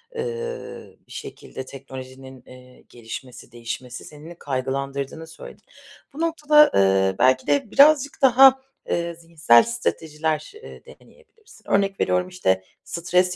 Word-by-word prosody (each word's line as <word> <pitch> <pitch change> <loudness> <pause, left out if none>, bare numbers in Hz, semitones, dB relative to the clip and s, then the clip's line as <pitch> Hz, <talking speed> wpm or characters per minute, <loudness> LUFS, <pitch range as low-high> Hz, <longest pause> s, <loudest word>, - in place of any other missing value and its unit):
ııı, 470 0 -6
bir - - -20
şekilde 130 - -9
teknolojinin, 130 -1 -11
eee, 125 0 -16
gelişmesi, 120 +2 -10
değişmesi, 120 +2 -7
seni 150 +2 -13
de 175 - -11
kaygılandırdığını 140 +3 -4
söyledin. 160 - -13 0.5
Bu 300 - -7
noktada, 300 -2 +4
ııı, 95 -1 +3
belki 130 0 +3
de 145 +8 0
birazcık 285 -1 +4
daha, 265 0 +6 0.3
ııı, 170 0 -2
zihinsel 165 -7 +3
stratejiler, 160 - -3
ııı, - - -11
deneyebilirsin. 465 -2 -19
Örnek 195 0 +1
veriyorum, 180 0 0
işte, 95 - -1 0.2
stres 180 +1 0
160 Hz, 120 wpm, -22 LUFS, -, 0.5 s, daha